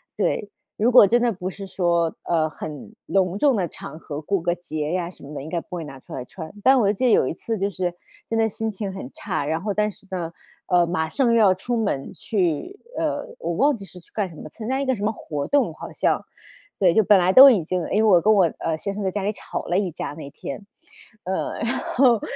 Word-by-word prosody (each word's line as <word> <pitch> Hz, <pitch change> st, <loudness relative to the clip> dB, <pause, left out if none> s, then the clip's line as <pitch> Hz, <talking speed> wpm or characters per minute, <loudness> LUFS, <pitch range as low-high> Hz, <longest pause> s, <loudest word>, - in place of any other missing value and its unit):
对， -, -, -1 dB, 0.3 s
如 235 Hz, +4 st, +3 dB
果 225 Hz, -5 st, +9 dB
真 240 Hz, +4 st, +3 dB
的 240 Hz, -1 st, +3 dB
不 185 Hz, -1 st, -4 dB
是 195 Hz, +1 st, -8 dB
说， 170 Hz, -3 st, +1 dB
呃， 160 Hz, -2 st, +1 dB
很 155 Hz, +7 st, -8 dB
隆 185 Hz, -1 st, +1 dB
重 275 Hz, +1 st, +3 dB
的 180 Hz, -4 st, 0 dB
场 155 Hz, -, -10 dB
合， 150 Hz, -2 st, -6 dB
过 195 Hz, +5 st, 0 dB
个 175 Hz, 0 st, +1 dB
节 155 Hz, -3 st, -4 dB
呀 175 Hz, -1 st, -1 dB
什 180 Hz, -, -16 dB
么 145 Hz, +2 st, -9 dB
的， 140 Hz, -, -5 dB
应 155 Hz, -, -8 dB
该 170 Hz, -, -1 dB
不 180 Hz, -, -9 dB
会 165 Hz, -, -4 dB
拿 135 Hz, -2 st, -10 dB
出 -, -, -13 dB
来 125 Hz, -, -4 dB
穿。 160 Hz, -1 st, -9 dB
但 265 Hz, 0 st, +6 dB
我 205 Hz, -3 st, +3 dB
记 255 Hz, +6 st, -1 dB
得 240 Hz, -, +5 dB
有 130 Hz, -, +4 dB
一 -, -, -2 dB
次 225 Hz, +5 st, -4 dB
就 195 Hz, +1 st, 0 dB
是 180 Hz, -2 st, -2 dB, 0.4 s
真 225 Hz, -, 0 dB
的 225 Hz, 0 st, +3 dB
心 220 Hz, +2 st, -3 dB
情 195 Hz, -1 st, -5 dB
很 165 Hz, -9 st, -7 dB
差， -, -, -3 dB
然 160 Hz, +2 st, -1 dB
后 205 Hz, 0 st, -2 dB
但 210 Hz, +1 st, +1 dB
是 200 Hz, -, -14 dB
呢， 170 Hz, -3 st, -3 dB, 0.4 s
呃， 175 Hz, -2 st, +4 dB
马 160 Hz, -2 st, -1 dB
上 240 Hz, +4 st, +2 dB
要 215 Hz, -5 st, +6 dB
出 240 Hz, +6 st, -3 dB
门 195 Hz, -11 st, -2 dB
去， 195 Hz, -, -2 dB, 0.2 s
呃， -, -, -1 dB
我 -, -, -2 dB
忘 290 Hz, -1 st, +3 dB
记 200 Hz, -3 st, -10 dB
是 180 Hz, -, -12 dB
去 170 Hz, -, -23 dB
干 200 Hz, -4 st, -1 dB
什 160 Hz, -, -13 dB
么， -, -, -9 dB
参 220 Hz, +7 st, -8 dB
加 265 Hz, +1 st, 0 dB
一 -, -, -1 dB
个 260 Hz, -1 st, +1 dB
什 205 Hz, -, -6 dB
么 215 Hz, -, +2 dB
活 150 Hz, -9 st, -5 dB
动 285 Hz, -1 st, +2 dB
好 -, -, -8 dB
像， -, -, 0 dB, 0.6 s
对， 180 Hz, -4 st, +4 dB
就 220 Hz, -, +4 dB
本 205 Hz, 0 st, +6 dB
来 180 Hz, +1 st, +3 dB
都 270 Hz, +1 st, +11 dB
已 200 Hz, -10 st, +3 dB
经， 180 Hz, +1 st, -2 dB
诶， 215 Hz, +2 st, +1 dB
我 190 Hz, -5 st, +6 dB
跟 215 Hz, +1 st, +5 dB
我 190 Hz, -4 st, +5 dB
呃， 160 Hz, -1 st, -1 dB
先 200 Hz, +4 st, -4 dB
生 205 Hz, 0 st, -4 dB
在 190 Hz, -, +1 dB
家 205 Hz, 0 st, -3 dB
里 205 Hz, -, +1 dB
吵 -, -, -6 dB
了 175 Hz, -, 0 dB
一 185 Hz, -4 st, -1 dB
架 150 Hz, -, -5 dB
那 150 Hz, -2 st, -8 dB
天。 170 Hz, +8 st, -8 dB, 0.6 s
呃， 190 Hz, +1 st, -2 dB
然 240 Hz, +3 st, 0 dB
后， 245 Hz, -4 st, +3 dB
190 Hz, 275 characters per minute, -23 LUFS, 170-220 Hz, 0.6 s, 都